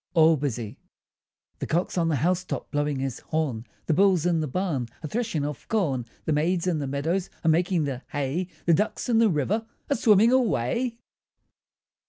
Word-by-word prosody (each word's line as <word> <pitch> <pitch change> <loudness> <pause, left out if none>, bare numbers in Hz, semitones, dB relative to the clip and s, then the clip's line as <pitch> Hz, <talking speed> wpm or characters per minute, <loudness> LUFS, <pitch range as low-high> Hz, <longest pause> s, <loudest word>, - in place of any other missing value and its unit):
ALL 160 0 +6
BUSY 125 -5 -4 0.8
The - - -3
cock's 175 +3 0
on 170 -2 +1
the 160 - +1
house 180 +6 +1
top, - - -5
Blowing 145 -1 0
his 135 -1 -3
horn; 140 -8 -2 0.2
The 160 - +1
bull's 185 -1 +3
in 170 -2 +2
the 155 - -1
barn, 145 -5 -1 0.2
A - - -3
threshing 210 -7 -2
of 145 -2 -6
corn; 140 - 0 0.2
The 155 - +1
maids 170 +4 +1
in 175 -4 0
the 140 - -3
meadows 160 +7 -1 0.2
Are - - +5
making 175 +1 +2
the 135 -3 -3
hay, 145 +5 -2 0.2
The 170 - +5
ducks 210 +8 0
in 225 -2 +4
the 225 -1 +5
river 195 +8 0 0.2
Are - - +4
swimming 220 0 +5
away. 235 - +1
160 Hz, 185 wpm, -26 LUFS, 145-185 Hz, 0.8 s, ALL